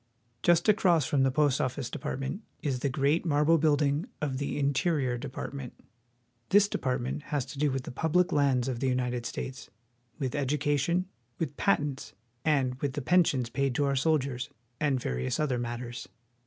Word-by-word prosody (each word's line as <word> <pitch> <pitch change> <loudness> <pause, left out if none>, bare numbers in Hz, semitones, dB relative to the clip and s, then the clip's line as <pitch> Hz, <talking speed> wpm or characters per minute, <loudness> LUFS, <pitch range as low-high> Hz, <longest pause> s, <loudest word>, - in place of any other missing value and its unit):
Just 175 +2 +4
across 185 -8 +4
from 140 - +1
the 135 - +4
Post 145 0 +2
Office 130 0 -2
Department 135 - -4 0.2
is 135 -5 0
the 140 - 0
great 140 +5 +1
marble 155 0 +3
building 145 0 +2
of 135 -3 -2
the 145 - -2
Interior 140 -2 +1
Department. 130 0 -6 0.8
This 205 +1 +6
depart 130 -9 -1
ment 130 +4 -3
has 145 -4 -1
to 140 - -9
do 150 0 +3
with 135 -1 -2
the - - -7
public 160 +7 +1
lands 135 -4 +2
of 125 -3 -2
the 135 - 0
United 125 -1 -1
States, 135 +2 -6 0.5
with 130 -5 -2
education, 145 +5 +1 0.3
with 150 -4 -3
patents, 145 -8 0 0.4
with 135 -1 0
the 145 - -4
pensions 140 -8 +3
paid 135 -2 0
to 145 - +2
our 140 0 +1
soldiers, 135 -3 0 0.3
and 145 -4 +1
various 65 - -2
other 135 -5 +1
matters. 120 0 -5
140 Hz, 165 wpm, -29 LUFS, 130-150 Hz, 0.8 s, This